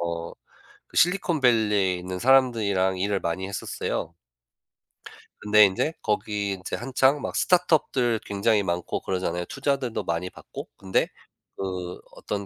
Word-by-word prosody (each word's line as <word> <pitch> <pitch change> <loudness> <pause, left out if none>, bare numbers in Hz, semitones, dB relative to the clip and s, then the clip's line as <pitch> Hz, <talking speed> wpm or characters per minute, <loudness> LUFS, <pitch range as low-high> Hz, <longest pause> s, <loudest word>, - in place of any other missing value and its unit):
어 85 0 -3 0.6
그 - - -17
실리콘밸리에 120 - +3
있는 90 +1 -5
사람들이랑 105 -6 +3
일을 100 +1 0
많이 85 +3 -2
했었어요. 85 -4 -4 1.3
근데 105 0 +6
인제 100 +11 0
거기 105 -1 -1
인제 95 -1 -4
한창 130 +3 +2
막 - - -4
스타트업들 145 -10 +2
굉장히 105 +1 +1
많고 85 -2 -2
그러잖아요, 90 -2 -2
투자들도 135 -3 -2
많이 85 +2 -2
받고. - - -10
근데 95 -1 +1 0.5
그 90 -2 -4 0.2
어떤 100 -1 -4
100 Hz, 300 characters per minute, -25 LUFS, 95-125 Hz, 1.3 s, 근데